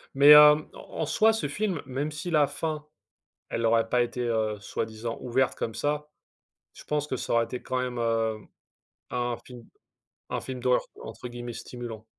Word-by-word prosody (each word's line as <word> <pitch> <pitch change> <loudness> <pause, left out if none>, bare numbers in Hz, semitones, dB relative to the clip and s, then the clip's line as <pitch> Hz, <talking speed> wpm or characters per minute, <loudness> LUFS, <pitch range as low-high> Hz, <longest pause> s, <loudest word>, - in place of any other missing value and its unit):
Mais 140 +1 +7
hem, 150 0 +8
en - - -8
en - - +1
soit 225 -1 +4
ce 220 - -2
film, 205 -7 -2
même 140 +4 -2
si 155 +4 -5
la 150 -3 +4
fin, 155 0 -4 0.6
elle 115 0 -1
aurait 115 0 +3
pas 125 +1 +3
été, 120 +1 -2
heu, 110 -2 0
soi-disant 110 +2 -4
ouverte 130 +1 0
comme 115 - -4
ça, 150 +4 -2 0.7
je - - -13
pense 150 0 -1
que 130 - -2
ça - - -4
aurait 115 0 +4
été 125 - -6
quand 130 - -3
même, 125 -1 -3
hem, 115 -2 0 0.6
un 120 -1 -2
film 120 -2 -12 0.6
un - - -2
film 130 -1 -6
d'horreur 125 0 +2 0.2
entre 110 +3 -8
guillemets 120 0 -7
«stimulant». 115 -2 -8
125 Hz, 180 wpm, -27 LUFS, 115-150 Hz, 0.7 s, hem